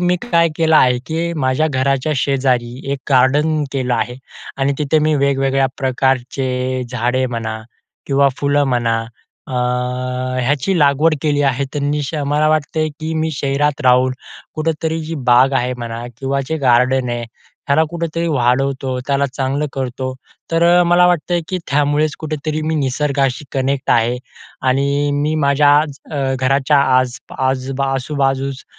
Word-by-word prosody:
मी 180 0 +2
काय 170 -8 +2
केलं 160 -1 +3
आहे 125 -3 +4
की 165 +1 -2
माझ्या 130 +4 +2
घराच्या 135 +1 0
शेजारी 130 -2 0
एक 140 - -3
गार्डन 145 +4 +3
केलं 130 -3 0
आहे, 120 +1 -2 0.4
आणि 135 +1 +1
तिथे 150 +1 +2
मी 155 0 +2
वेगवेगळ्या 135 -1 +1
प्रकारचे 130 -1 -1
झाडे 125 +1 0
म्हणा 115 -2 -4 0.5
किंवा 140 0 +3
फुलं 145 0 +2
म्हणा, 120 -2 +1 0.5
अ, 125 0 -2
याची 145 +8 0
लागवड 150 +2 +3
केली 145 -2 +1
आहे. 135 0 +1 0.2
मी 145 +1 -1
श 145 - -5
मला 150 +2 +2
वाटते 155 0 0
की 160 +1 -3
मी 160 0 0
शहरात 140 +1 -1
राहून 125 0 +4 0.4
कुठेतरी 160 +1 -2
जी 165 +1 -5 0.2
बाग 125 +3 +5
आहे 125 -1 0
म्हणा 120 0 -6
किंवा 135 +1 -1
जे 160 - -1
गार्डन 130 -1 +2
आहे, 120 0 -3 0.4
त्याला 140 +3 +4
कुठेतरी 170 0 -3
वाढवतो 130 -1 0
त्याला 140 0 +1
चांगलं 135 +2 -1
करतो. 130 0 -4 0.4
तर 165 0 +1 0.2
अ, - - +5
मला 175 +1 +4
वाटतं 175 0 +1
की 185 - -2
त्यामुळेच 145 +2 +1
कुठेतरी 155 0 -3
मी 160 +1 -1
निसर्गाशी 140 -1 0
कनेक्ट 135 0 -1
आहे. 120 +1 +2 0.5
आणि 140 +2 +1
मी 150 +2 0
माझ्या 145 +1 +4 0.4
अ, 135 -3 -1
घराच्या 135 +2 +2 0.2
आज 125 -1 -1 0.2
आज 130 0 -1 0.2
आजूबाजूस 135 0 -1
135 Hz, 145 wpm, -18 LUFS, 130-150 Hz, 0.5 s, बाग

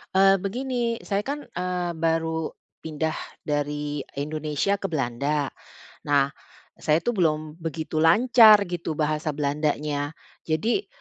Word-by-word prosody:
Eee, 195 0 +6
begini, 240 +4 -2
saya 200 -1 0
kan, 290 +1 -3
eee, 180 0 -3
baru 160 0 0 0.3
pindah 160 0 -3 0.3
dari 145 0 -2 0.2
Indonesia 155 +6 -1
ke 195 - -2
Belanda. 140 -1 -1 0.6
Nah, 140 -1 +3 0.5
saya 155 +2 +2
tuh 240 - +1
belum 155 -5 0
begitu 160 -1 -3
lancar 215 +5 +7
gitu 170 -2 -3
bahasa 155 0 -1
Belandanya. 145 0 -1 0.3
Jadi 220 - 0
160 Hz, 115 wpm, -25 LUFS, 150-195 Hz, 0.6 s, lancar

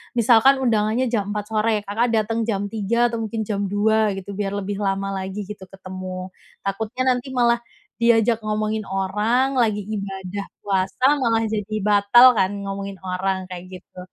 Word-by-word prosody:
misalkan 235 +3 +5
undangannya 225 +1 +1
jam 205 -3 -1
04:00 210 +1 -5
sore, 215 -1 +1
Kakak 230 +4 0
dateng 225 +1 0
jam 205 -2 -1
03:00 230 +3 +1
atau 230 - -3
mungkin 220 0 -3
jam 200 -2 -1
02:00 210 0 +2
gitu, 195 +1 -7
biar 200 -1 -2
lebih 200 0 -3
lama 195 0 -1
lagi 190 +2 -4
gitu 205 -3 -9
ketemu, 185 -1 -7 0.3
takutnya 220 +6 -2
nanti 250 +2 -5
malah 235 -1 +3 0.4
diajak 230 -1 +3
ngomongin 215 0 -1
orang, 210 +8 0
lagi 210 -3 +1
Ibadah 195 -2 -5 0.2
puasa, 195 +5 0
malah 230 -3 +2
jadi 215 0 -3
batal 205 +4 +6
kan 190 +1 +2
ngomongin 195 0 -5
orang 190 0 -2
kayak 180 0 -7 0.2
gitu 180 - -15
210 Hz, 155 wpm, -22 LUFS, 195-225 Hz, 0.4 s, batal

